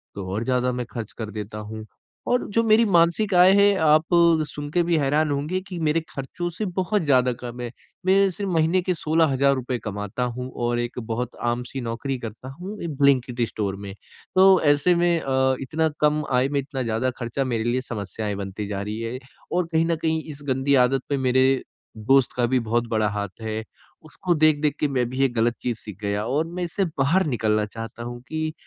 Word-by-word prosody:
तो 95 -2 -5
और 110 +3 -1
ज़्यादा 125 0 +1
मैं 125 -1 -3
खर्च 115 -3 -6
कर 110 -2 -5
देता 105 0 -6
हूँ। 110 +1 -7 0.4
और 245 0 +2
जो 230 - +3
मेरी 225 +1 +5
मासिक 180 +2 +3
आय 180 +1 +7
है 200 0 +5
आप 155 0 +5 0.4
सुन 145 0 -7
के 175 - +2
भी 170 -1 +1
हैरान 150 +2 +2
होंगे 150 +7 -1
कि 180 - -6
मेरे 160 +1 +1
खर्चों 160 +6 -5
से 210 +5 -4
बहुत 190 +2 0
ज़्यादा 130 -4 +3
कम 120 0 -8
है। 120 -1 -5 0.3
मैं 195 +1 +4
सिर्फ़ 195 +2 -4
महीने 165 +3 +2
के 180 0 0
16 160 0 +2
हज़ार 140 +1 +3
रुपए 125 -1 -2
कमाता 105 +3 -3
हूँ 125 +1 -4 0.2
और 120 0 0
एक 120 +1 -3
बहुत 115 +2 -4
आम 120 +1 -1
सी 135 - -5
नौकरी 120 +3 -3
करता 115 +2 -8
हूँ 200 +4 -6
एक 155 -4 -4
ब्लिंकिट 130 -4 +2
स्टोर 100 -2 -3
में, 100 0 -8 0.4
तो 190 0 +7
ऐसे 145 +4 +4
में 170 -1 +2
अ, 130 -1 +2
इतना 160 +4 0
कम 150 0 +3
आय 125 +2 +2
में 140 -1 0
इतना 135 -1 -4
ज़्यादा 115 +3 0
खर्चा 120 +3 -2
मेरे 115 -4 -1
लिए 120 +2 0
समस्याएँ 105 -3 -4
बनती 100 +1 -5
जा 100 -1 -3
रही 105 +2 -4
है 115 +3 -4 0.3
और 180 -1 +1
कहीं 160 0 +3
न 165 0 +1
कहीं 160 0 0
इस 145 0 -9
गंदी 135 +2 +2
आदत 135 +1 0
पे 140 - +1
मेरे 130 0 +3 0.3
दोस्त 130 +4 +3
का 120 - +3
भी 130 +1 +2
बहुत 115 +1 -1
बड़ा 110 -1 +1
हाथ 100 +1 -5
है। 110 0 -3 0.4
उसको 175 +3 -1
देख-देख 155 -1 +3
के 150 - +2
मैं 125 -3 0
भी 130 - -6
ये 135 - +5
गलत 120 +1 +2
चीज़ 120 -3 -2
सीख 105 -3 -9
गया 100 +1 -1
और 150 +6 0
मैं 180 +1 -4
इसे 185 +3 -1
बाहर 160 +4 +1
निकलना 110 -5 +1
चाहता 115 +2 -8
हूँ 120 0 -7
कि, 155 0 -3
130 Hz, 210 wpm, -24 LUFS, 115-160 Hz, 0.4 s, आय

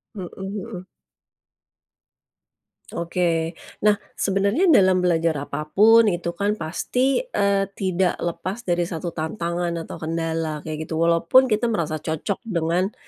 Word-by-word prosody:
Heeh 185 -4 -6 0.3
heeh. 195 -3 -6 2.1
Oke, 170 -1 -1 0.2
nah 210 0 +4 0.2
sebenarnya 200 - +1
dalam 185 - +5
belajar 165 -2 +2
apapun 210 +11 +4
itu 175 -3 -1
kan 205 +1 +1
pasti, 250 +10 0
eee, 200 - +1
tidak 185 -1 0
lepas 175 +6 -3
dari 175 -5 0
satu 170 0 -4
tantangan 170 +1 -3
atau - - -8
kendala 160 -1 -2
kayak 155 0 -5
gitu. 160 - -6
Walaupun 170 +10 +4
kita 215 +2 +1
merasa 170 -9 -1
cocok 160 +6 -3
dengan 180 0 0
175 Hz, 120 wpm, -23 LUFS, 165-200 Hz, 2.1 s, dalam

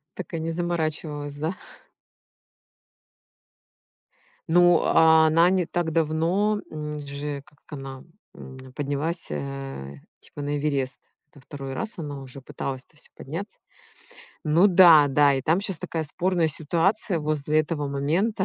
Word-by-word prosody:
Так 185 - -8
и 165 - -2
не 165 +1 -3
заморачивалась, 155 -4 -3
да? 160 +5 -2 2.9
Ну, 175 0 +5
а, 160 -1 +5
она 165 +2 +5
не 185 -2 +2
так 175 -1 -2
давно, 165 +7 +1
м, 150 -1 -5
же 140 0 -5
как 150 - -23
она, 135 -3 -8 0.3
м, 130 0 -11 0.2
поднялась, 145 +4 -1
э, 135 - -6 0.2
типа 145 - -9
на 145 0 -2
Эверест. 140 -3 -2 0.3
Во 140 - -15
2 135 0 -8
раз 220 +7 -4
она 145 -4 -5
уже 135 0 -10
пыталась, 130 0 -5
это 155 - -27
всё, - - -18
подняться. 165 +10 -7 0.9
Ну 165 +5 +5
да-да 150 -7 +6
и 135 - -2
там 165 +7 +2
щас 195 -4 -3
такая 160 +1 -3
спорная 170 +2 0
ситуация 170 +5 0
возле 155 0 +1
этого 150 -2 -3
момента. 165 +10 0
155 Hz, 135 wpm, -25 LUFS, 140-170 Hz, 2.9 s, да-да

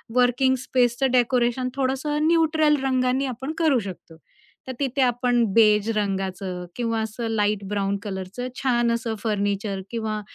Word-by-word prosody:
Working 250 +1 +3
स्पेसचं 250 +1 +1
decoration 250 0 +2
थोडंसं 275 +3 0
neutral 315 -2 +3
रंगांनी 260 0 +1
आपण 265 +3 -4
करू 310 -6 +3
शकतो. 185 -5 -9 0.5
तर - - -3
तिथे 275 -1 0
आपण 245 -1 +2
बेज 210 -1 +4
रंगाचं 190 -2 -3
किंवा 230 -2 -1
असं 220 +2 -4
लाईट 210 -2 0
ब्राउन 200 -1 -1
कलरचं 195 +4 -5 0.2
छान 240 -3 +2
असं 230 -1 -2
फर्निचर 200 -2 -1
किंवा 220 -2 -3
240 Hz, 135 wpm, -24 LUFS, 210-260 Hz, 0.5 s, बेज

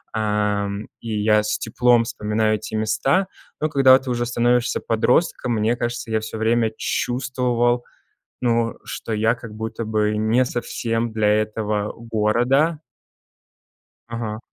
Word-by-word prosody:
эм, 105 -1 -1
и 110 -2 -3
я 105 0 +4
с 105 - -1
теплом 120 +1 +3
вспоминаю 110 -1 0
те 110 - -7
места. 110 - +1 0.3
Но 155 - 0
когда 135 -2 +6
ты 130 - -8
уже 120 0 0
становишься 120 0 +1
подростком, 125 +2 +1
мне 110 +2 +1
кажется, 120 -1 -4
я 110 -1 0
всё 110 0 -6
время 115 0 +2
чувствовал, 125 -1 0 0.6
ну, 115 -2 +1
что 115 - -6
я 110 +2 +2
как 115 -2 -10
будто 110 +1 -4
бы 105 -1 0
не 115 +4 +2
совсем 115 -1 -2
для 110 -1 +1
этого 105 0 0
города. 120 +8 +1 1.3
Ага. 115 -2 -4
115 Hz, 130 wpm, -22 LUFS, 110-120 Hz, 1.3 s, когда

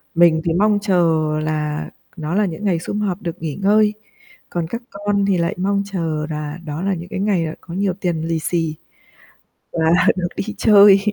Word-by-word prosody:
Mình 165 -1 +5
thì 165 - +1
mong 205 +3 +3
chờ 170 -6 +2 0.2
là 150 -1 -2 0.3
nó 155 +1 -3
là 210 0 +3
những 180 +4 -5
ngày 180 -4 +2
sum 205 +5 -4
họp 195 -2 -2
được 170 0 -5
nghỉ 155 -3 -3
ngơi, 210 +2 +3 0.6
còn 170 -2 -2
các 230 +6 -5
con 200 0 0
thì 195 -2 +2
lại 170 0 0
mong 200 +2 0
chờ 160 -5 -2
là 150 0 -4
đó 150 +2 -4
là 195 0 0
những 175 0 -6
cái 205 - -4
ngày, 195 -5 +1
ờ, 155 - -4
có 170 - -10
nhiều 195 0 0
tiền 175 -3 -2
lì 165 -1 0
xì 165 -1 -1 1.0
và 170 - -2 0.4
được 180 -2 -1
đi 215 +1 -3
chơi. 200 -2 +7
175 Hz, 200 wpm, -20 LUFS, 160-200 Hz, 1.0 s, chơi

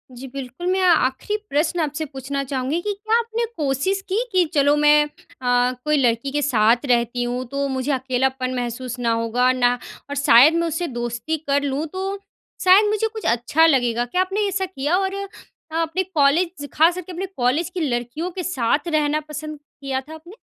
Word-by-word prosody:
जी, 260 +2 -8
बिल्कुल। 275 +5 -6
मैं 375 0 +1
आखिरी 320 +6 +1
प्रश्न 310 +5 0
आपसे 310 0 -2
पूछना 275 0 -4
चाहूँगी 270 +4 -2
कि 415 +1 -2
क्या 435 +3 0
आपने 465 0 -2
कोशिश 300 +7 0
की 415 +6 +1
कि 370 -2 +3
चलो, 285 -1 +4
मैं 295 0 +5
अ, - - -10 0.8
कोई 300 0 +2
लड़की 245 0 +1
के 295 - 0
साथ 240 -2 +3
रहती 240 0 +1
हूँ, 245 +1 -2
तो 280 +2 -2
मुझे 265 +1 -2
अकेलापन 260 0 -1
महसूस 245 0 -4
ना 235 -1 +1
होगा, 230 +2 +2
ना 245 -1 +2 0.4
और 285 - -4
शायद 280 +1 +6
मैं 335 - 0
उससे 330 +2 -2
दोस्ती 240 +5 -3
कर 280 0 +2
लूँ, 285 +2 -1
तो 385 +4 -4 0.5
शायद 380 +3 +7
मुझे 430 +1 +1
कुछ 440 - -7
अच्छा 290 +7 +2
लगेगा, 245 -6 +2
क्या 360 +10 0
आपने 395 +3 0
ऐसा 385 0 -1
किया? 335 -2 -1
और 385 0 -1 0.7
अपने 330 +4 -1
कॉलेज 330 -1 +1
ख़ास 330 +3 +4
करके 365 0 -7
अपने 360 +2 -4
कॉलेज 260 +8 +1
की 365 0 -5
लड़कियों 245 +8 -3
के 365 0 -5
साथ 290 0 0
रहना 305 -1 +1
पसंद 305 0 -6 0.2
किया 265 -1 -2
था 300 +4 -12
आपने? 340 +6 -13
290 Hz, 185 wpm, -22 LUFS, 255-350 Hz, 0.8 s, शायद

